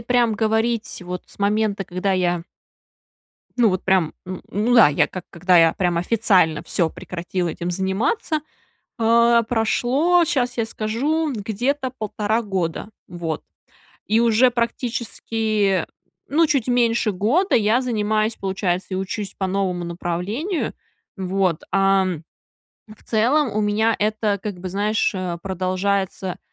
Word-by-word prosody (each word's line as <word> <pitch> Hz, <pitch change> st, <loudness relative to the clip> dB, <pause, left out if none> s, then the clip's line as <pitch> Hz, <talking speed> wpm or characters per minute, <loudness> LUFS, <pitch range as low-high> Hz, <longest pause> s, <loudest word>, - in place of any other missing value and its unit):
прям 240 Hz, -1 st, +2 dB
говорить 220 Hz, 0 st, -1 dB
вот 180 Hz, 0 st, -5 dB
с -, -, -17 dB
момента, 205 Hz, -1 st, 0 dB
когда 185 Hz, +3 st, -1 dB
я 175 Hz, -2 st, 0 dB, 1.1 s
ну, 235 Hz, -3 st, +5 dB
вот 185 Hz, -1 st, -2 dB
прям, 185 Hz, -4 st, +2 dB
м, 185 Hz, 0 st, -6 dB
ну 220 Hz, +5 st, +1 dB
да, 225 Hz, -10 st, +8 dB
я 145 Hz, -, +2 dB
как 185 Hz, -1 st, -8 dB
когда 180 Hz, +1 st, +2 dB
я 165 Hz, -1 st, +6 dB
прям 175 Hz, -2 st, 0 dB
официально 185 Hz, -5 st, +2 dB
всё 165 Hz, -3 st, 0 dB
прекратила 180 Hz, 0 st, -4 dB
этим 175 Hz, +2 st, -4 dB
заниматься. 210 Hz, -, -1 dB, 0.6 s
А, 235 Hz, +1 st, +4 dB
прошло, 250 Hz, +10 st, +2 dB
щас 250 Hz, -5 st, -1 dB
я 225 Hz, -, +1 dB
скажу, 275 Hz, +9 st, -1 dB
где-то 250 Hz, +6 st, -2 dB
1,5 215 Hz, +1 st, -1 dB
года. 190 Hz, 0 st, -3 dB, 0.2 s
Вот. 165 Hz, -3 st, -4 dB, 0.7 s
И 220 Hz, +2 st, +3 dB
уже 235 Hz, +2 st, +4 dB
практически, 225 Hz, -4 st, -1 dB, 0.4 s
ну, 325 Hz, +3 st, +3 dB
чуть 275 Hz, -5 st, +1 dB
меньше 235 Hz, -3 st, +2 dB
года 245 Hz, -, +1 dB
я 225 Hz, +3 st, +3 dB
занимаюсь, 215 Hz, -2 st, 0 dB
получается, 190 Hz, -1 st, -2 dB
и 185 Hz, -, -1 dB
учусь 195 Hz, +1 st, -4 dB
по 190 Hz, -, -1 dB
новому 185 Hz, -2 st, -1 dB
направлению. 180 Hz, -, -3 dB, 0.4 s
Вот, 185 Hz, -3 st, 0 dB
ам, 190 Hz, -4 st, +2 dB, 0.7 s
в 215 Hz, -, -15 dB
целом, 250 Hz, +5 st, +2 dB
у -, -, +2 dB
меня 215 Hz, +2 st, +2 dB
это, 210 Hz, -1 st, 0 dB
как 200 Hz, -4 st, -5 dB
бы, 185 Hz, -, -5 dB
знаешь, 210 Hz, +4 st, 0 dB
э, 180 Hz, -2 st, -3 dB
продолжается, 190 Hz, 0 st, -2 dB
210 Hz, 135 wpm, -22 LUFS, 185-235 Hz, 1.1 s, да